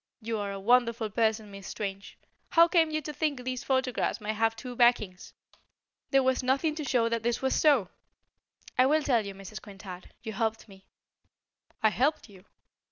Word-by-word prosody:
You 225 -1 -3
are 200 -1 -3
a 195 - -5
wonderful 230 0 +2
person, 220 -1 0
Miss 195 -1 -9
Strange. 195 -1 -6 0.3
How 335 0 +6
came 330 -2 +3
you 310 0 -1
to 300 - -5
think 285 -4 -2
these 255 0 -3
photographs 260 -3 0
might 215 0 -3
have 225 +1 +1
two 245 +2 -8
backings? 235 -7 +2 0.8
There 270 -1 +4
was 260 0 +2
nothing 275 +5 +1
to 305 0 -5
show 245 -4 +2
that 230 0 -1
this 240 +3 -1
was 265 - +2
so." 280 - +4 0.9
"I 255 - +6
will 305 +2 +3
tell 240 -6 +2
you, 200 -1 -7
Mrs. 195 +2 -9
Quintard. 195 -3 -10
You 220 -2 -5
helped 225 +2 -2
me." 190 -2 -17 1.0
"I 220 - +6
helped 275 +4 0
you?" 190 -1 -16
230 Hz, 180 wpm, -29 LUFS, 210-265 Hz, 1.0 s, How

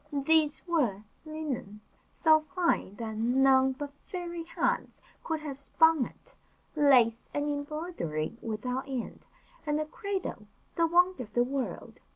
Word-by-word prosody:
These 300 +1 +2
were, 245 - +1 0.2
linen, 285 -10 -5 0.3
so 315 -1 +5 0.2
fine 340 - +1
that 220 0 -5
none 265 +3 +4
but 285 +1 -7
fairy 345 -2 -5
hands - - -1 0.2
could 320 -2 -2
have 280 -3 -5
spun 320 0 +4
it; - - -11 0.4
lace 250 -6 +4
and 290 0 0
embroidery 290 - -3
without 250 +5 -3
end; 255 -3 -5 0.4
and 295 -1 0
a 310 - -1
cradle, 375 - -5 0.3
the 335 0 +3
wonder 355 -1 +3
of 215 -4 -9
the 240 - +3
world. 265 +1 -4
285 Hz, 135 wpm, -29 LUFS, 245-320 Hz, 0.4 s, so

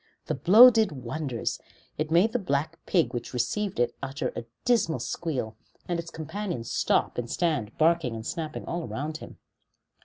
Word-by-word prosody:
That 130 - -4
blow 230 +8 +10
did 220 -4 +2
wonders; 130 -1 -3 0.4
it 155 0 -2
made 175 +7 +4
the 245 - +1
black 160 -2 -2
pig 160 -10 +2
which 120 +1 -5
received 185 - -1
it 120 - +2
utter 140 +1 -3
a 115 - -5 0.2
dismal 230 -10 +2
squeal, 130 -10 -3 0.3
and 175 -1 -1
its 170 0 -6
companions 160 - -5
stop - - +1
and 120 -1 -4
stand 145 -12 -1
barking 160 -6 +2
and 110 0 -7
snapping 155 0 -4
all 170 -1 -3
around 155 +3 -4
him. - - -11
155 Hz, 165 wpm, -27 LUFS, 125-175 Hz, 0.4 s, blow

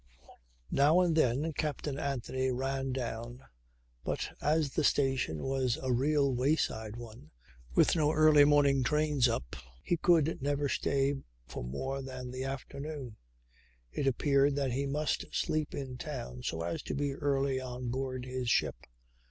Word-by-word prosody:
Now 150 +6 +5
and 175 -3 +2
then 150 +2 +2
Captain 145 -1 -3
Anthony 130 -1 -1
ran 135 +1 -1
down; 120 0 -5 0.6
but - - -3
as 150 -1 +2
the - - 0
station 135 - +1
was 135 -2 0
a 130 -1 -1
real 140 +2 +2
wayside 120 -5 0
one, 115 -9 -10 0.5
with - - +5
no 155 -2 +3
early 155 -2 +6
morning 145 -2 +4
trains 150 -1 +2
up, 65 - -3 0.3
he 175 - +1
could 165 -3 +3
never 145 +1 0
stay 140 0 +1 0.3
for 65 0 -7
more 135 - -3
than 130 -1 -7
the 130 +1 -4
afternoon. 135 -2 -6 0.7
It 135 - -1
appeared 140 +2 +3
that 140 -2 0
he 140 +3 -1
must 150 +2 -1
sleep 155 -1 -1
in 130 -3 -5
town 125 -4 -6
so 80 -9 -3
as 85 0 -3
to - - -4
be 145 -1 -1
early 135 -2 0
on 125 -1 -5
board 130 0 -3
his 130 -1 -3
ship. - - 0
135 Hz, 150 wpm, -31 LUFS, 125-145 Hz, 0.7 s, early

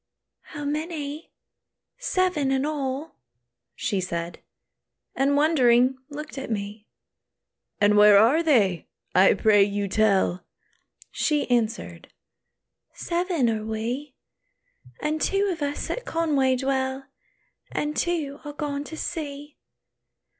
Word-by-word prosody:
"How 290 0 -5
many? 300 0 -4 0.7
Seven 370 - 0
in 265 +1 +1
all," 290 0 -3 0.6
she 195 -2 -1
said, 170 -1 -4 0.7
And 280 +2 +2
wondering 260 -4 +4
looked 295 -1 -7
at 265 - -6
me. 210 0 -5 0.9
"And 205 0 +4
where 210 -1 +8
are 235 +10 +5
they? 210 - +2 0.3
I 190 +1 +5
pray 210 -2 +4
you 200 0 +1
tell." 195 -3 +2 0.7
She 300 -2 0
answered, 235 -1 -1 0.8
"Seven 345 -6 0
are 220 -2 -1
we; 235 +6 -4 0.9
And 305 +1 -1
two 395 +1 +1
of 325 - -10
us 285 0 -3
at - - -4
Conway 290 - +1
dwell, 265 0 -1 0.7
And 300 0 -2
two 310 -5 -1
are 295 -1 -7
gone 290 -1 -3
to 320 - -8
sea. 295 -4 -6
275 Hz, 110 wpm, -25 LUFS, 220-300 Hz, 0.9 s, where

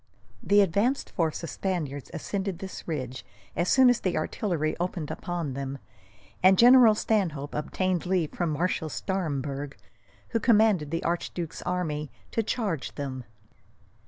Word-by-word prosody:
The 205 0 +5
advanced 205 +9 +1
force 165 -2 -1
of 165 - -4
Spaniards 155 -8 -3
ascended 190 +2 -3
this 190 +1 -8
ridge, 130 -6 -4 0.3
as 175 +2 0
soon 260 -1 +6
as 245 -1 +4
the 185 -2 -1
artillery 160 -7 -1
opened 175 -3 -3
upon 170 -6 -3
them, 135 +1 -4 0.6
and 185 +1 +6
General 240 -1 +8
Stanhope 170 -11 -1
obtained 180 +3 -1
leave 180 -4 +1
from 175 -2 -1
Marshal 160 +1 -1
Staremberg, 145 -6 -3 0.5
who 230 - 0
commanded 215 - +4
the 165 +2 -2
archduke's 170 -1 -3
army, 155 -5 -2 0.2
to 225 - +1
charge 200 - -2
them. 130 -3 -5
175 Hz, 135 wpm, -27 LUFS, 150-195 Hz, 0.6 s, General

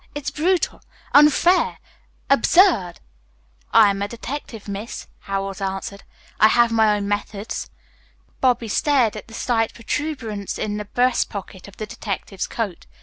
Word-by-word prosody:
It's 290 -1 -3
brutal, 345 +2 0 0.3
unfair 300 +5 +5 0.5
absurd." 275 - +4 0.8
"I 215 -3 +7
am 195 0 -4
a 200 - 0
detective, 235 -1 -7
Miss," 200 +3 -6
Howells 195 0 -4
answered. 195 +1 -4 0.4
"I 215 - +8
have 235 +1 +4
my 220 -2 +3
own 200 -1 -3
methods." 205 +1 -3 0.7
Bobby 245 -3 +2
stared 250 0 +2
at 210 - -8
the 225 - -11
slight 225 -2 0
protuberance 230 -5 -4
in 210 -1 -2
the 210 - -5
breast 250 +5 +1
pocket 195 -2 -8
of 200 - -15
the 215 - -4
detective's 200 -2 -5
coat. 210 -7 -4
220 Hz, 140 wpm, -22 LUFS, 200-255 Hz, 0.8 s, I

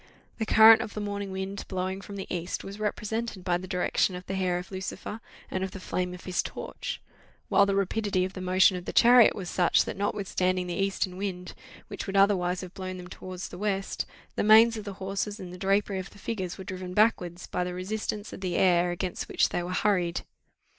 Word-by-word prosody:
The 220 - -1
current 220 +1 +8
of 210 - -6
the - - -2
morning 200 -1 -4
wind 190 +1 -4
blowing 190 0 -3
from 200 0 -9
the 195 - -5
east 175 +1 -4
was 200 +2 -8
represented 215 -1 -3
by 175 -1 +1
the 185 - -8
direction 180 +1 +1
of 180 0 -8
the - - -4
hair 185 -2 0
of 180 +2 -7
Lucifer, 190 +3 -5 0.3
and 185 - -1
of 190 - -2
the 195 - -9
flame 180 0 -2
of 180 - -12
his 185 -1 0
torch; - - -6 0.5
while 200 - +5
the 200 - +1
rapidity 200 -1 +1
of 190 - -6
the 185 - -6
motion 185 +1 +4
of 180 -1 -6
the - - -4
chariot 240 0 +7
was 190 -3 -5
such, 175 0 +3
that, - - -4
notwithstanding 185 -2 0
the 175 - -4
eastern 190 0 -1
wind, 185 -2 -4 0.3
which - - -6
would 195 0 -1
otherwise 185 -3 +3
have 185 -1 -9
blown 185 -1 -5
them 180 0 -9
towards 185 -1 -7
the 175 - -9
west, 195 -2 -2 0.3
the - - 0
manes 220 +2 +7
of 215 -2 -6
the 200 - -5
horses, 195 +2 -3
and 180 -1 -8
the - - -8
drapery 195 0 +1
of 185 - -6
the - - -17
figures, 190 -4 -4
were 190 - -7
driven 185 -1 -6
backwards, 180 -5 +2
by 180 - -2
the 180 0 -4
resistance 210 +2 -4
of - - -8
the 180 -2 -2
air 180 -1 +4
against 175 +1 -3
which - - +2
they - - -1
were 175 - -5
hurried. 180 -3 +1
190 Hz, 220 wpm, -28 LUFS, 180-200 Hz, 0.5 s, current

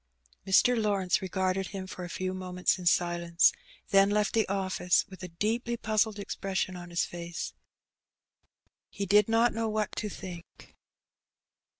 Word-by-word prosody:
Mr. 245 +6 +5
Lawrence 200 -2 +1
regarded 190 0 -1
him 195 -2 -6
for 185 -1 -8
a 175 - -6
few 185 +2 -3
moments 180 -1 -1
in 180 - -3
silence, 170 -1 +3 0.4
then 195 0 +5
left 210 0 +1
the 225 -2 +2
office 185 -2 +1
with 190 - -11
a 180 - -5
deeply 225 +7 -2
puzzled 215 -1 +1
expression 195 -2 -3
on 175 0 -8
his 170 0 0
face. 170 -1 -6 1.4
He 200 - -4
did 210 +2 +4
not 230 +1 +3
know 225 0 -1
what 215 -1 -2
to 210 - -2
think. 175 -3 -10
190 Hz, 150 wpm, -29 LUFS, 180-210 Hz, 1.4 s, Mr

